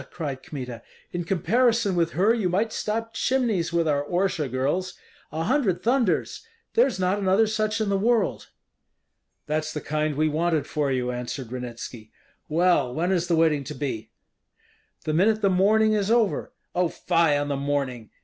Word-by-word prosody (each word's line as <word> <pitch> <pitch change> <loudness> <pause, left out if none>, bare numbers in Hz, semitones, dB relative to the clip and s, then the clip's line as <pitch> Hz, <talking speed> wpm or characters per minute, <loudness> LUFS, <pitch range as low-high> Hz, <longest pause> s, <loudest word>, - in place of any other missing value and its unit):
cried 140 -6 -5
Kmita. 125 -5 -7 0.3
"In 175 0 -2
comparison 220 +4 +2
with 170 -1 +1
her 200 +7 +3
you 215 -6 0
might 210 +5 0
stop 225 +1 -3
chimneys 225 -11 0
with 170 -1 +1
our 145 -1 +1
Orsha 175 -2 -1
girls! 145 +9 -1 0.4
A 160 - -2
hundred 230 - +1
thunders! 240 -4 +1 0.3
there's 465 - +3
not 185 +2 +1
another 195 +3 +3
such 215 0 -1
in 215 -2 0
the 195 -1 +1
world." 225 0 +1 1.0
"That's 155 +1 -1
the 150 - -4
kind 155 0 -1
we 155 +2 +2
wanted 160 0 0
for 145 -2 -1
you," 125 -1 0
answered 125 0 -5
Ranitski. 120 -3 -7 0.4
"Well, 160 -5 +3
when 170 +7 -1
is 175 -2 +1
the 170 - +2
wedding 160 -3 +3
to - - -6
be?" 130 -5 -4 0.9
"The 155 - -1
minute 215 +6 +3
the 195 - +4
mourning 215 +4 +4
is 205 -1 0
over." 230 -3 +1 0.2
"Oh, 180 -1 +1
fie 165 -3 +2
on 145 0 -2
the 140 - 0
mourning! 135 -5 -2
170 Hz, 170 wpm, -25 LUFS, 145-210 Hz, 1.0 s, the